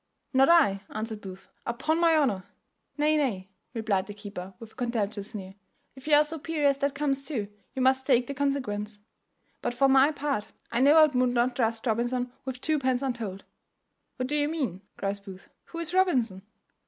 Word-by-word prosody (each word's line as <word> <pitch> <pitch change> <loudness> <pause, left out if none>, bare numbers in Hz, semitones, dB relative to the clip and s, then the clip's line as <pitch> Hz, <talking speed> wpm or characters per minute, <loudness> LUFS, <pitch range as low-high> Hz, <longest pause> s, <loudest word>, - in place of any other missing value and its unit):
"Not 270 +2 +5
I," 280 -14 +5
answered 220 0 -5
Booth, 190 0 -10 0.2
"upon 310 +8 -1
my 335 -1 +5
honour." 215 -11 +1 0.5
"Nay, 305 +1 +3
nay," 195 -10 -1 0.2
replied 205 -4 0
the 205 - -8
keeper, 200 -3 -8
with 225 -1 -11
a - - -24
contemptuous 215 -4 -2
sneer, 190 -4 -7 0.4
"if 265 +2 -13
you 300 - +6
are 295 - +7
so 315 +1 -6
peery 310 0 -2
as 280 -1 +3
that 280 -1 0
comes 280 -1 0
to, 240 -9 -3 0.3
you 260 - -1
must 265 0 +3
take 250 -3 +4
the 280 - -4
consequence. 255 -7 -2 0.6
But 240 - -2
for 275 +2 +4
my 270 +2 +5
part, 280 -7 -3 0.2
I 235 - 0
know 280 +4 +6
I 315 -1 +9
would 300 - -3 0.2
not 245 +1 +1
trust 225 -1 0
Robinson 240 +2 0
with 260 -1 -5
twopence 275 -4 +1
untold." 225 -7 -3 0.7
"What 255 0 -2
do 295 - -1
you 295 0 +2
mean?" 260 - -2 0.2
cries 200 0 -2
Booth; 195 -1 -12 0.2
"who 335 - -10
is 335 0 -4
Robinson?" 255 - +2
255 Hz, 190 wpm, -28 LUFS, 210-285 Hz, 0.7 s, I